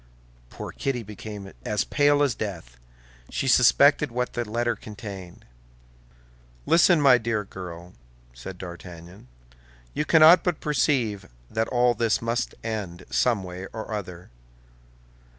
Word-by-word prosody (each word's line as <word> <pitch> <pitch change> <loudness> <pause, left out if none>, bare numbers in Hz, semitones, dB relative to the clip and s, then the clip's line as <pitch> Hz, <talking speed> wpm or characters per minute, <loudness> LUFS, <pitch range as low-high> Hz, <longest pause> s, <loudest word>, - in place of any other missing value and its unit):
Poor - - -8
Kitty 130 -4 -3
became 105 -1 -9
as 105 -2 0
pale 145 0 +3
as 140 -4 +1
death; 85 - -6 0.5
she - - -3
suspected - - +5
what 125 +1 -2
the 120 -3 -3
letter 120 +1 0
contained. 100 -4 -10 1.2
"Listen, 170 0 +5
my 135 -4 +6
dear 115 -2 -1
girl," 90 -2 -9 0.4
said 75 +10 -9
D'Artagnan; 85 -2 -10 0.7
"you - - -1
cannot 160 +3 +7
but 175 -4 -1
perceive 120 -8 0 0.2
that 110 0 0
all 125 -1 +2
this 115 -1 +1
must 115 +1 -2
end, 100 -6 -5
some 115 -6 +1
way 90 +1 -7
or 110 0 -6
other. 90 -6 -7
110 Hz, 125 wpm, -25 LUFS, 95-125 Hz, 1.2 s, cannot